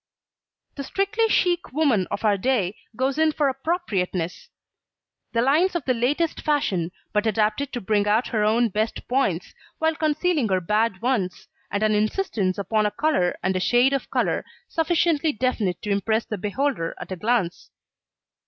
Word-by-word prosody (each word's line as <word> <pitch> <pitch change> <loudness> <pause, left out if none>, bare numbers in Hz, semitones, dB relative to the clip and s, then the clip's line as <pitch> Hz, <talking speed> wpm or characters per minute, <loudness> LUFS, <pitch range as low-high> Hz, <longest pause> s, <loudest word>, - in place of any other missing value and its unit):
The 280 - -3
strictly 400 - 0
chic 355 -4 +1
woman 265 - +2
of - - -3
our 210 -1 +4
day 205 -3 0 0.2
goes 265 +4 0
in 315 -1 +3
for 290 -2 +2
appropriateness; 260 - -2 0.8
the 230 0 +1
lines 325 +8 +3
of 340 - -2
the 255 - +2
latest 285 +8 0
fashion, 195 - 0 0.2
but 210 +1 +1
adapted 220 +6 0
to 245 - -3
bring 205 +1 +1
out 220 +4 +2
her 215 -3 0
own 225 +2 +3
best 215 +3 -2
points, 245 -10 0 0.2
while 320 0 +1
concealing 310 - +1
her 190 -1 +2
bad 210 +3 0
ones, 225 -8 -1 0.2
and 205 +2 -1
an 215 0 +3
insistance 210 - 0
upon 210 +2 +1
a - - 0
colour 295 - +1
and 190 0 +1
a - - +1
shade 245 +8 +3
of 275 - -2
colour, - - 0 0.2
sufficiently 325 -1 +1
definite 215 -7 -1
to 210 - -2
impress 220 +3 +1
the 215 - -5
beholder 210 -3 -1
at - - -8
a - - -2
glance. 210 -2 -1
235 Hz, 165 wpm, -24 LUFS, 205-295 Hz, 0.8 s, our